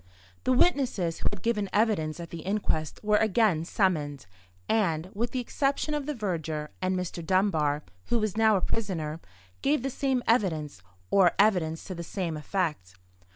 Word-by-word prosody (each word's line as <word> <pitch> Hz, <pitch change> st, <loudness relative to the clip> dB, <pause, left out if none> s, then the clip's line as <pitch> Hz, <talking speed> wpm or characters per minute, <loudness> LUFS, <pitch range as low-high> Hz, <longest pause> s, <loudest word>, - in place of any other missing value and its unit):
The -, -, +3 dB
witnesses 250 Hz, -, +2 dB
who -, -, 0 dB
had 205 Hz, -3 st, -7 dB
given 210 Hz, -4 st, 0 dB
evidence 195 Hz, -8 st, +1 dB
at 170 Hz, -1 st, -7 dB
the 170 Hz, -, -6 dB
inquest 180 Hz, -4 st, -1 dB
were 210 Hz, 0 st, +4 dB
again 215 Hz, -6 st, +3 dB
summoned, 150 Hz, -, 0 dB, 0.4 s
and—with 200 Hz, +2 st, 0 dB
the 255 Hz, -, -2 dB
exception 275 Hz, +4 st, -1 dB
of 295 Hz, -1 st, -2 dB
the 300 Hz, -, -2 dB
verger, 160 Hz, -, -3 dB
and 185 Hz, 0 st, +1 dB
Mr. 180 Hz, -1 st, -4 dB
Dunbar, 160 Hz, -5 st, +2 dB, 0.2 s
who 240 Hz, -, +1 dB
was 215 Hz, -3 st, -1 dB
now 220 Hz, -1 st, +4 dB
a 190 Hz, -, +1 dB
prisoner—gave 160 Hz, -, -3 dB
the 270 Hz, -, -1 dB
same 260 Hz, -1 st, 0 dB
evidence, 160 Hz, -, +1 dB, 0.3 s
or 185 Hz, -3 st, +5 dB
evidence 180 Hz, -6 st, +2 dB
to 185 Hz, -, -6 dB
the 170 Hz, -, -6 dB
same 170 Hz, -1 st, -3 dB
effect. 150 Hz, -, -2 dB
185 Hz, 155 wpm, -28 LUFS, 160-220 Hz, 0.4 s, or